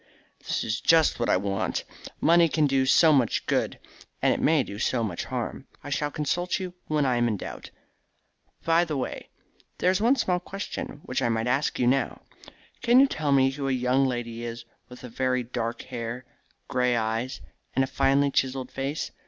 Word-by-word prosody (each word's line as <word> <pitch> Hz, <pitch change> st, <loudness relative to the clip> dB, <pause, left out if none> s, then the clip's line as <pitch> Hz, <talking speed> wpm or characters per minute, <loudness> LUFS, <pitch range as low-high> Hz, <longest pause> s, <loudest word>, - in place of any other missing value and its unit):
"That -, -, -2 dB
is 110 Hz, +2 st, -2 dB
just 165 Hz, -5 st, +4 dB
what 120 Hz, -, 0 dB
I -, -, +4 dB
want. 95 Hz, 0 st, -2 dB, 0.4 s
Money 170 Hz, 0 st, +5 dB
can 155 Hz, 0 st, +2 dB
do 135 Hz, -2 st, +2 dB
so 155 Hz, +4 st, +6 dB
much 130 Hz, -6 st, +1 dB
good, -, -, 0 dB, 0.4 s
and -, -, +3 dB
it -, -, -3 dB
may 155 Hz, -3 st, +3 dB
do 100 Hz, -2 st, -8 dB
so 120 Hz, 0 st, 0 dB
much 95 Hz, -6 st, -3 dB
harm. -, -, -5 dB, 0.2 s
I 145 Hz, -, -7 dB
shall 145 Hz, +2 st, 0 dB
consult 175 Hz, +5 st, -1 dB
you 185 Hz, -1 st, -5 dB
when 150 Hz, -2 st, +1 dB
I 125 Hz, -2 st, +2 dB
am 120 Hz, 0 st, +2 dB
in 110 Hz, -3 st, -1 dB
doubt. -, -, -8 dB, 1.0 s
By 165 Hz, +1 st, +4 dB
the 155 Hz, -4 st, -3 dB
way, 130 Hz, -, -5 dB, 0.5 s
there 180 Hz, -, +3 dB
is 190 Hz, +2 st, 0 dB
one 240 Hz, +5 st, +4 dB
small 180 Hz, -8 st, 0 dB
question 190 Hz, -6 st, -6 dB
which 125 Hz, -, -2 dB
I -, -, +1 dB
might 115 Hz, 0 st, 0 dB
ask 135 Hz, +4 st, 0 dB
you 125 Hz, -, +1 dB
now. 135 Hz, +2 st, +1 dB, 0.6 s
Can 240 Hz, +1 st, +5 dB
you 275 Hz, -, +8 dB
tell 155 Hz, -, -2 dB
me 135 Hz, -1 st, +4 dB
who 135 Hz, 0 st, -4 dB
a -, -, +1 dB
young 130 Hz, +1 st, +2 dB
lady 120 Hz, -2 st, -4 dB
is 115 Hz, 0 st, -6 dB, 0.2 s
with 125 Hz, -, -12 dB
very 125 Hz, +1 st, -1 dB
dark 115 Hz, -1 st, -4 dB
hair, 120 Hz, +1 st, -6 dB, 0.4 s
grey 125 Hz, -2 st, +1 dB
eyes, 115 Hz, +3 st, -2 dB, 0.4 s
and 135 Hz, -, +3 dB
a -, -, -1 dB
finely 140 Hz, +1 st, +2 dB
chiselled 130 Hz, -1 st, -1 dB
face? 135 Hz, +3 st, -3 dB
130 Hz, 195 wpm, -26 LUFS, 120-150 Hz, 1.0 s, you